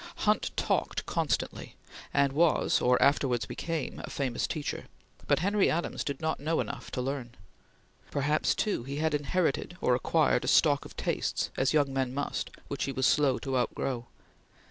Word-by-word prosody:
Hunt - - +2
talked - - 0
constantly, - - -2 0.4
and 140 -1 +2
was, 160 +1 +3
or 125 0 +4
afterwards 130 -5 +3
became, 165 -5 -4
a - - -6
famous 130 -4 -1
teacher, 150 -2 -4 0.4
but - - +4
Henry 200 +3 +2
Adams 170 +2 -1
did 140 -2 -3
not 160 0 -1
know 160 +3 0
enough - - -4
to 125 - -1
learn. 130 -3 -4 0.7
Perhaps, 145 +2 +1
too, 210 - 0
he 135 +4 -6
had 155 +1 0
inherited 160 +3 0
or 125 - +2
acquired 125 - +2
a - - -4
stock - - +4
of - - -12
tastes, - - -1
as 135 - +2
young 145 -3 +2
men 130 -1 -1
must, 145 - -2 0.2
which 140 - -2
he 140 - -2
was 130 -1 0
slow 140 -3 +3
to 135 -1 -3
outgrow. 125 -1 -1
140 Hz, 165 wpm, -29 LUFS, 130-155 Hz, 0.7 s, or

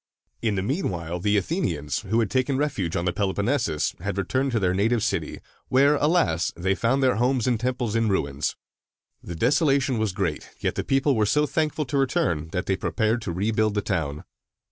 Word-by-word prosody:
In 110 -3 0
the 95 - -1
mean 140 - -1
while 85 -1 -4
the 105 +3 +2
Athenians, 85 - -1
who 110 +3 0
had 110 - -1
taken 130 +1 +1
refuge 130 - -1
on 85 - -1
the 90 - +1
Peloponnesus, 100 - 0
had 100 +3 -4
returned 130 +8 0
to 115 - +2
their 90 -2 +1
native 110 +4 +1
city, 95 -8 -2 0.3
where, 140 +3 +4
alas! 145 - +2
they 95 +3 0
found 125 +7 +1
their 130 -3 +3
houses 125 0 +1
and 120 -3 +1
temples 125 -2 -1
in 115 -1 +2
ruins. 70 -8 -1 0.7
The 85 - -7
desolation 135 - +2
was 110 -2 0
great; 90 -5 -3
yet - - -1
the - - -3
people 135 0 +2
were 105 -2 +2
so 150 +6 +3
thankful 150 +1 -1
to 140 +2 -1
return, 85 - 0
that 90 +2 -3
they 95 - +1
prepared 110 +7 0
to 105 - -4
rebuild 105 +3 0
the 105 - +1
town. 80 -5 -2
110 Hz, 195 wpm, -25 LUFS, 90-130 Hz, 0.7 s, where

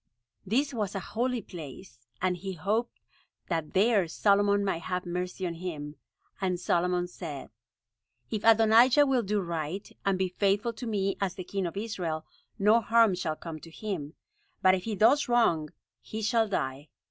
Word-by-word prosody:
This 275 +7 +1
was 210 -4 -2
a - - -1
holy 245 0 0
place, 145 -7 -11 0.2
and 185 -1 +2
he 190 +2 -5
hoped 210 +8 -2 0.5
that 165 -2 -2
there 200 -2 +4
Solomon 200 +3 +3
might 170 -4 -1
have 180 +1 -3
mercy 180 +1 -3
on 170 - -2
him. 155 -4 -6 0.5
And 180 -2 0
Solomon 180 0 +1
said: 160 -6 -8 0.8
"If 215 -2 -2
Adonijah 225 +5 +6
will 265 -3 +2
do 210 -1 0
right, 170 +1 -4
and 195 -1 +1
be 185 0 0
faithful 200 +5 +1
to 240 +2 -7
me 195 -3 0
as 190 -2 -1
the 185 - -6
king 190 0 -2
of 170 - -7
Israel, 175 -7 -3 0.3
no 215 +4 +4
harm 225 -2 +4
shall 170 -4 -2
come 160 -1 -8
to 165 - -12
him; 165 -4 -5 0.5
but 185 - +6
if 185 -1 -1
he 220 -2 -2
does 245 +8 +4
wrong, 170 -11 +3 0.3
he 220 0 -6
shall 225 +1 +2
die." 140 -6 -3
190 Hz, 170 wpm, -29 LUFS, 170-220 Hz, 0.8 s, Adonijah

